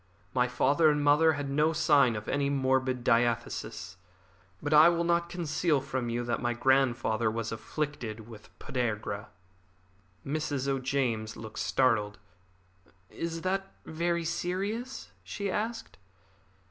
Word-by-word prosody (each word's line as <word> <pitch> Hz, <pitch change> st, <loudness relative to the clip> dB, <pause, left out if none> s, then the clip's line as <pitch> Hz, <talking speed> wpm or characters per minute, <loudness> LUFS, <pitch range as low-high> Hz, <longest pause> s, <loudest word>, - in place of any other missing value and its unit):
My 125 Hz, 0 st, +2 dB
father 140 Hz, +5 st, +3 dB
and 150 Hz, -1 st, +1 dB
mother 150 Hz, +3 st, +5 dB
had 145 Hz, -1 st, -4 dB
no 150 Hz, +3 st, +2 dB
sign 145 Hz, -6 st, +4 dB
of 105 Hz, 0 st, -6 dB
any 140 Hz, -1 st, 0 dB
morbid 130 Hz, -2 st, +1 dB
diathesis, 120 Hz, -4 st, 0 dB, 0.6 s
but 145 Hz, +6 st, -2 dB
I 155 Hz, +3 st, +8 dB
will 170 Hz, 0 st, 0 dB
not 170 Hz, 0 st, +1 dB
conceal 165 Hz, -3 st, 0 dB
from 130 Hz, -2 st, -3 dB
you 120 Hz, +1 st, -1 dB
that 120 Hz, -1 st, -2 dB
my 120 Hz, -1 st, 0 dB
grandfather 120 Hz, -4 st, +2 dB
was 115 Hz, 0 st, -3 dB
afflicted 115 Hz, -2 st, -4 dB
with 110 Hz, -3 st, -13 dB
podagra." 105 Hz, -4 st, -3 dB, 1.0 s
Mrs. 145 Hz, -2 st, -2 dB
O'James 130 Hz, -5 st, -1 dB
looked 110 Hz, -1 st, -8 dB
startled. 110 Hz, -6 st, +1 dB, 0.9 s
"Is 165 Hz, 0 st, -4 dB
that 195 Hz, +2 st, -2 dB
very 170 Hz, +1 st, -1 dB
serious?" 195 Hz, +9 st, -3 dB
she 200 Hz, -2 st, -4 dB
asked. 225 Hz, -, -4 dB
140 Hz, 125 wpm, -29 LUFS, 120-165 Hz, 1.0 s, I